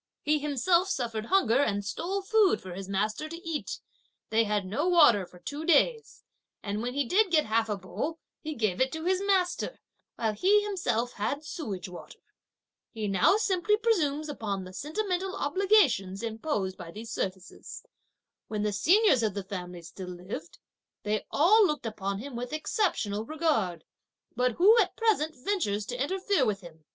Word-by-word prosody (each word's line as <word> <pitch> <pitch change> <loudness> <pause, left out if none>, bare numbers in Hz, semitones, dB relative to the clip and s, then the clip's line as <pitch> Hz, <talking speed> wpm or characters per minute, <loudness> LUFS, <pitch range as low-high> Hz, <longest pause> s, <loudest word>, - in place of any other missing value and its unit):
He 300 0 +2
himself 300 +6 +2
suffered 230 - -2
hunger 270 - +3
and 205 -7 0
stole 370 - -3
food 425 -1 +3
for 185 -1 -9
his 195 +1 -7
master 215 +9 -1
to 335 +1 -9
eat; 320 -3 -3 0.5
they 225 +1 +3
had 210 -2 0
no 265 - -1
water 235 - +5
for 180 - -16
two 285 - -6
days; 445 +9 +2 0.4
and 205 +1 -3
when 245 +2 -3
he 285 -1 +1
did 390 - +3
get 315 -3 +3
half 225 +1 +1
a 210 - -1
bowl, 285 - -4 0.2
he 310 -1 -5
gave 215 -4 0
it 260 - +2
to 320 +1 -5
his 370 +1 +1
master, 385 +3 0 0.4
while 220 -2 -1
he 400 - +3
himself 245 - -1
had 280 +9 -3
sewage 215 - -5
water. 180 -1 -11 0.7
He 220 -3 -4
now 195 - +4
simply 415 0 +1
presumes 310 -10 +1
upon 210 -9 -4
the 185 0 -10
sentimental 370 - -2
obligations 290 - +2
imposed 220 -4 -2
by 175 -2 -8
these 220 +6 -8
services. 190 0 -5 0.6
When 210 -1 -2
the 210 -1 0
seniors 330 - +4
of 215 -3 -1
the 200 - -3
family 180 -2 -7
still 180 +2 -8
lived, 175 -2 -8 0.5
they 210 0 -2
all 405 +9 +5
looked 300 -6 -3
upon 200 -3 -3
him 255 +4 -7
with 245 +3 -5
exceptional 310 - -1
regard; 225 - -1 0.5
but 250 0 +1
who 400 - +6
at - - +1
present 380 -9 +1
ventures 250 - -1
to 245 +3 -2
interfere 380 +1 +1
with 210 -4 0
him? 160 -3 -14
250 Hz, 170 wpm, -28 LUFS, -, 0.7 s, who